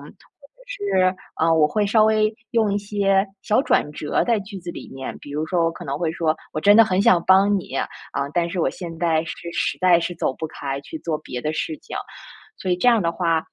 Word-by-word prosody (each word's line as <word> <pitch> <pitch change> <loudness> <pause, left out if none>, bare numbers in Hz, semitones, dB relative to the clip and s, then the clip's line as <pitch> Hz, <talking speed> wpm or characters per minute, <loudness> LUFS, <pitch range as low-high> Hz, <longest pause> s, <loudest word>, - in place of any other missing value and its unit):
者 - - -15 0.5
是， 400 - +1 0.3
嗯， 165 0 +4
我 150 - +6
会 205 +4 0
稍 215 +1 +4
微 215 0 +2 0.2
用 220 -3 +2
一 205 - +1
些 200 -1 +1 0.2
小 215 +4 +2
转 150 - +1
折 150 - -1
在 230 -4 +1
句 200 0 -8
子 175 -1 -7
里 - - -9
面， 135 0 -6
比 145 - -12
如 155 +2 -2
说 170 -1 +1
我 165 - +2
可 175 +1 -10
能 140 +1 -3
会 165 -2 0
说： 160 -1 0 0.2
“我 155 - -1
真 205 +5 +6
的 225 - +9
很 190 -2 +1
想 175 -4 +5
帮 195 +2 +5
你， 135 - -7
啊， - - 0 0.5
但 170 -1 +1
是 180 -1 -3
我 - - +1
现 165 -3 -8
在 160 -2 +2
是 170 +1 -7
实 - - -1
在 180 -2 +5
是 175 +1 -3
走 155 - -1
不 160 - -5
开 140 -3 -5
去 320 - -8
做 155 - -2
别 125 - -7
的 155 - -1
事 155 0 -3
情。 - - -9 0.7
“所 185 - -4
以 180 - +3
这 215 +8 +3
样 230 -3 +3
的 170 - +1
话， 165 -2 +1
175 Hz, 255 characters per minute, -22 LUFS, 160-205 Hz, 0.7 s, 的